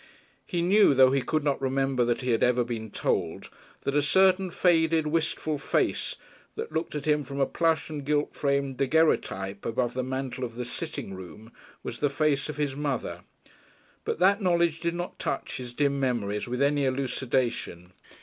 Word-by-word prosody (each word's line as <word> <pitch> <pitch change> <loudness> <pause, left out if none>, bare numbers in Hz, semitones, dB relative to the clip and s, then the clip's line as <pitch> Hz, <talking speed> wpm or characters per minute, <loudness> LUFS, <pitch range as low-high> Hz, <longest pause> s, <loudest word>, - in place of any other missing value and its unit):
He 175 -3 -1
knew, 195 -4 +5
though 130 0 +7
he 135 0 +2
could 155 +3 -1
not 140 -2 0
remember 135 -1 +1
that 120 +2 0
he 125 -1 0
had 115 - +1
ever 125 0 +3
been 115 -2 -5
told, - - -2 0.3
that 140 - -2
a 145 - +4
certain 190 +4 +3
faded, 165 -2 +3
wistful 155 -1 -1
face, - - 0 0.4
that - - -5
looked 160 0 -3
at 145 - -4
him 150 -1 +2
from 140 +1 -6
a 135 - +4
plush 165 +1 +1
and 150 -2 -5
gilt 145 +1 0
framed 140 -2 0
daguerreotype 125 -9 +1
above 120 +1 -1
the 130 - -1
mantel 130 0 -4
of 115 -2 -5
the 125 0 -4
"sitting 110 -4 -5
room," 95 +5 -10 0.3
was - - -6
the 145 - +2
face 145 -1 0
of 150 - -5
his 145 -3 -1
mother. 135 -12 -3 0.8
But - - -2
that 195 +5 +4
knowledge 170 -3 +2
did 170 0 -1
not 175 +1 -5
touch 135 - -3
his 125 -1 -7
dim 140 +2 0
memories 115 -6 -1
with 125 +3 0
any 145 0 +2
elucidation. 130 -8 -2
140 Hz, 180 wpm, -27 LUFS, 125-155 Hz, 0.8 s, though